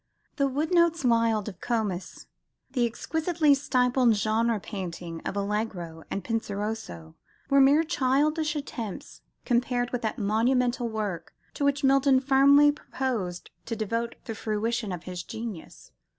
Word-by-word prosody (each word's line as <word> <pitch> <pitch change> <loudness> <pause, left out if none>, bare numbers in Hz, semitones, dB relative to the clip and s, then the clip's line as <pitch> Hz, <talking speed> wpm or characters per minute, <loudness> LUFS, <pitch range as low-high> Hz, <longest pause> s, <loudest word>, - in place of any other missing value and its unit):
The 280 -1 +2
"woodnotes 330 +2 +2
wild" 230 -3 +2
of 185 -5 -8
Comus, 210 -6 -3 0.5
the 245 -3 +2
exquisitely 315 +5 +1
stippled 250 -3 +2
genre 220 +2 +1
painting 175 -4 -6
of 205 - -3
Allegro 200 -6 -3
and 195 - -3
Penseroso, 205 - -4 0.4
were 275 0 +6
mere 285 +4 +5
childish 305 +1 +1
attempts 235 -8 -6 0.2
compared 245 0 0
with 245 - -2
that 220 - -2
monumental 240 +3 +1
work 210 -6 -4 0.2
to - - -4
which 280 0 +1
Milton 270 0 +4
firmly 280 +2 +5
proposed 235 -11 -4 0.2
to 230 - -2
devote 230 +2 -2
the 225 - -4
fruition 220 0 -2
of 175 -2 -5
his 180 -1 -5
genius. 220 -6 -8
235 Hz, 130 wpm, -27 LUFS, 210-275 Hz, 0.5 s, were